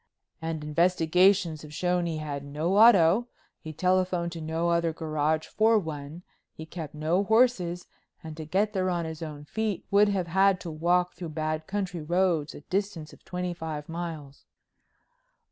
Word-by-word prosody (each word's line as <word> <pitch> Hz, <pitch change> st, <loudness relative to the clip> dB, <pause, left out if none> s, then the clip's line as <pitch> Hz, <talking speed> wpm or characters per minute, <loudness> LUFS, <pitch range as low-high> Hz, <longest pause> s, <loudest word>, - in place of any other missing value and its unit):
"And 160 Hz, -1 st, -4 dB
investigations 170 Hz, +2 st, +3 dB
have 150 Hz, 0 st, -10 dB
shown 180 Hz, -1 st, 0 dB
he 160 Hz, -2 st, -3 dB
had 145 Hz, -2 st, -5 dB
no 155 Hz, +7 st, 0 dB
auto, 215 Hz, 0 st, +6 dB, 0.3 s
he 155 Hz, -, -8 dB
telephoned 180 Hz, +1 st, 0 dB
to 165 Hz, -1 st, -7 dB
no 160 Hz, +2 st, -1 dB
other 170 Hz, -1 st, +1 dB
garage 155 Hz, -1 st, -1 dB
for 220 Hz, +1 st, +3 dB
one, 160 Hz, -2 st, -5 dB, 0.3 s
he 160 Hz, -, -9 dB
kept 160 Hz, -3 st, -8 dB
no 160 Hz, +6 st, +1 dB
horses, 205 Hz, -6 st, +2 dB, 0.4 s
and 160 Hz, -1 st, -7 dB
to 160 Hz, 0 st, -7 dB
get 200 Hz, +7 st, 0 dB
there 185 Hz, -2 st, 0 dB
on 175 Hz, -2 st, -1 dB
his 160 Hz, 0 st, -7 dB
own 150 Hz, -2 st, -7 dB
feet, 215 Hz, +3 st, -3 dB
would 205 Hz, +1 st, +5 dB
have 195 Hz, -3 st, 0 dB
had 190 Hz, +2 st, +3 dB
to 170 Hz, -, -6 dB
walk 175 Hz, +3 st, +1 dB
through 175 Hz, -3 st, -7 dB
bad 155 Hz, 0 st, -3 dB
country 190 Hz, -4 st, -3 dB
roads 170 Hz, -2 st, 0 dB
a -, -, -10 dB
distance 185 Hz, -3 st, -3 dB
of -, -, -18 dB
twenty 180 Hz, 0 st, -4 dB
five 160 Hz, -3 st, -6 dB
miles." 165 Hz, -4 st, -7 dB
170 Hz, 165 wpm, -27 LUFS, 155-185 Hz, 0.4 s, auto